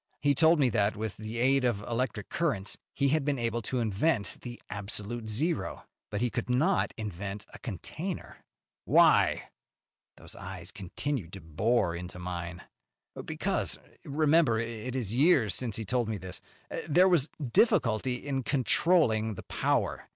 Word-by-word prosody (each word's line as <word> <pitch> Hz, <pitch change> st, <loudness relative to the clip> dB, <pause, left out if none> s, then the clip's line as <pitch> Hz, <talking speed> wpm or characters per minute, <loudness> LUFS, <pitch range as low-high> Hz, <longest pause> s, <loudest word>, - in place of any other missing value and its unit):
He 145 Hz, 0 st, +3 dB
told 160 Hz, +4 st, +5 dB
me 130 Hz, -4 st, +4 dB
that, 100 Hz, 0 st, +2 dB
with 110 Hz, 0 st, -4 dB
the 110 Hz, +2 st, -6 dB
aid 135 Hz, +2 st, +3 dB
of 120 Hz, -5 st, +1 dB
electric 115 Hz, -2 st, -2 dB
currents 135 Hz, -, -1 dB, 0.2 s
he 140 Hz, -1 st, +2 dB
had 155 Hz, +1 st, +2 dB
been 145 Hz, -1 st, 0 dB
able 120 Hz, -1 st, -1 dB
to 125 Hz, +3 st, -2 dB
invent 110 Hz, +2 st, 0 dB
the 120 Hz, -1 st, -8 dB
absolute 105 Hz, +3 st, -4 dB
zero, 155 Hz, +10 st, -1 dB, 0.2 s
but 105 Hz, -, -3 dB
he 120 Hz, -1 st, +1 dB
could -, -, -3 dB
not 155 Hz, +10 st, +2 dB
invent 100 Hz, -1 st, -5 dB
a -, -, -10 dB
container." 155 Hz, -, -5 dB, 0.5 s
"Why?" -, -, +4 dB, 0.7 s
Those -, -, -10 dB
eyes 95 Hz, 0 st, -7 dB
continued 100 Hz, -, -4 dB
to 95 Hz, -, -8 dB
bore 85 Hz, +4 st, +1 dB
into 90 Hz, +1 st, -7 dB
mine. 90 Hz, -1 st, -5 dB, 0.6 s
"Because -, -, -1 dB, 0.3 s
remember 150 Hz, -3 st, +3 dB
it 115 Hz, +2 st, -4 dB
is 115 Hz, -5 st, -2 dB
years 135 Hz, -, +4 dB
since 115 Hz, -1 st, -2 dB
he 110 Hz, -, -3 dB
told 120 Hz, +2 st, 0 dB
me 110 Hz, -, -1 dB
this 95 Hz, -1 st, -7 dB, 0.5 s
there 180 Hz, +5 st, +6 dB
was 165 Hz, -6 st, +3 dB, 0.2 s
difficulty 130 Hz, -, +3 dB
in 135 Hz, +1 st, -2 dB
controlling 125 Hz, -, +2 dB
the -, -, -8 dB
power. -, -, -1 dB
115 Hz, 150 wpm, -29 LUFS, 100-140 Hz, 0.7 s, there